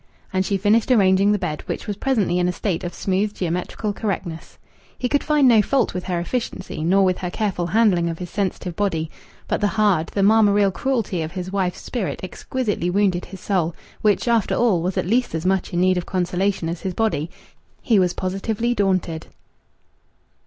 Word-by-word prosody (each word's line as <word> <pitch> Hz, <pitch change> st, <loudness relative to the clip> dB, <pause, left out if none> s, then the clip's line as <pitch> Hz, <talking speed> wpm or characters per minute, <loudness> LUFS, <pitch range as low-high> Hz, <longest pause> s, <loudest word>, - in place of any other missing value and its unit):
And 185 Hz, 0 st, +2 dB
she 195 Hz, +1 st, 0 dB
finished 210 Hz, +4 st, +2 dB
arranging 195 Hz, -4 st, +4 dB
the 210 Hz, -, +2 dB
bed, 170 Hz, -6 st, -3 dB
which -, -, -4 dB
was 205 Hz, -2 st, -3 dB
presently 210 Hz, -7 st, +1 dB
in 180 Hz, -, +2 dB
a -, -, +1 dB
state 180 Hz, -1 st, -2 dB
of 175 Hz, -, -3 dB
smooth 200 Hz, +3 st, -1 dB
geometrical 180 Hz, +4 st, -2 dB
correctness. 190 Hz, -6 st, -4 dB, 0.4 s
He 250 Hz, -, -1 dB
could 285 Hz, +3 st, +1 dB
find 300 Hz, -3 st, +3 dB
no 230 Hz, -3 st, +6 dB
fault 255 Hz, +3 st, +1 dB
with 180 Hz, 0 st, -4 dB
her 180 Hz, -2 st, -1 dB
efficiency, 185 Hz, -4 st, -4 dB
nor 190 Hz, +4 st, +4 dB
with 185 Hz, -1 st, +1 dB
her 180 Hz, -, -3 dB
careful 185 Hz, -3 st, -2 dB
handling 180 Hz, -4 st, +3 dB
of 165 Hz, -, -4 dB
his 175 Hz, -1 st, -7 dB
sensitive 185 Hz, -3 st, -2 dB
body. 165 Hz, -6 st, -1 dB, 0.4 s
But -, -, -1 dB
the 205 Hz, -, +3 dB
hard, 195 Hz, -7 st, +3 dB
the 200 Hz, -, -1 dB
marmoreal 205 Hz, -1 st, +4 dB
cruelty 225 Hz, -8 st, -1 dB
of 160 Hz, +1 st, -5 dB
his 185 Hz, -1 st, -5 dB
wife's 185 Hz, -3 st, -1 dB
spirit 230 Hz, -7 st, -3 dB
exquisitely 210 Hz, -1 st, -2 dB
wounded 185 Hz, -1 st, +1 dB
his 190 Hz, -2 st, -11 dB
soul, 175 Hz, -5 st, 0 dB, 0.3 s
which, 210 Hz, +2 st, +2 dB
after 230 Hz, -3 st, +2 dB
all, 215 Hz, -8 st, +2 dB
was 180 Hz, +2 st, -2 dB
at -, -, 0 dB
least 240 Hz, +1 st, +1 dB
as 160 Hz, +2 st, -3 dB
much 190 Hz, 0 st, +1 dB
in 175 Hz, -, -1 dB
need 185 Hz, 0 st, +3 dB
of 175 Hz, -, -8 dB
consolation 185 Hz, 0 st, 0 dB
as 165 Hz, +1 st, -4 dB
his 185 Hz, -2 st, -4 dB
body. 190 Hz, -9 st, 0 dB, 0.5 s
He 220 Hz, -4 st, +4 dB
was 180 Hz, -2 st, +2 dB
positively 210 Hz, +5 st, -1 dB
daunted. 185 Hz, -6 st, 0 dB
190 Hz, 195 wpm, -22 LUFS, 175-210 Hz, 0.5 s, no